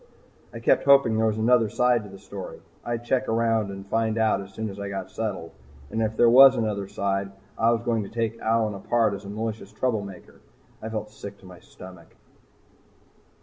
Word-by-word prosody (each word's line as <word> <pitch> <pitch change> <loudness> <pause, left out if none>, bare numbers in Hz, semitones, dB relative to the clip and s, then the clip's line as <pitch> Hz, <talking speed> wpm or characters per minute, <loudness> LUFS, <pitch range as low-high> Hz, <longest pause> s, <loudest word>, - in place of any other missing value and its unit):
I - - -8
kept - - +2
hoping 140 -5 +5
there 110 0 +2
was 110 -1 -1
another 115 0 +3
side 125 0 +2
to 105 - -11
the 95 - -11
story. 100 -1 -9 0.2
I'd 120 0 -4
check 130 +2 0
around 115 -2 +1
and 95 0 -8
find 110 +2 0
out 110 -2 +2
as 100 0 -11
soon 110 +1 -5
as 100 - -10
I 100 0 -4
got 95 -1 -6
settled. 100 -7 -4 0.4
And 110 - -1
if 110 0 -1
there 120 - +5
was 130 +3 +8
another 105 -4 -2
side, 100 0 -2 0.2
I 115 0 +2
was 115 0 +1
going 115 -2 0
to 100 - -7
take 115 0 -3
Allyn 110 -1 +1
apart 110 +2 +1
as 100 +1 -7
a - - -8
malicious 110 -1 -5
trouble 110 0 -1
maker. 95 -3 -12 0.4
I 110 - -5
felt 105 -1 -5
sick 100 -1 -10
to - - -16
my 90 -2 -12
stomach. 90 -1 -14
110 Hz, 205 wpm, -25 LUFS, 100-115 Hz, 0.4 s, was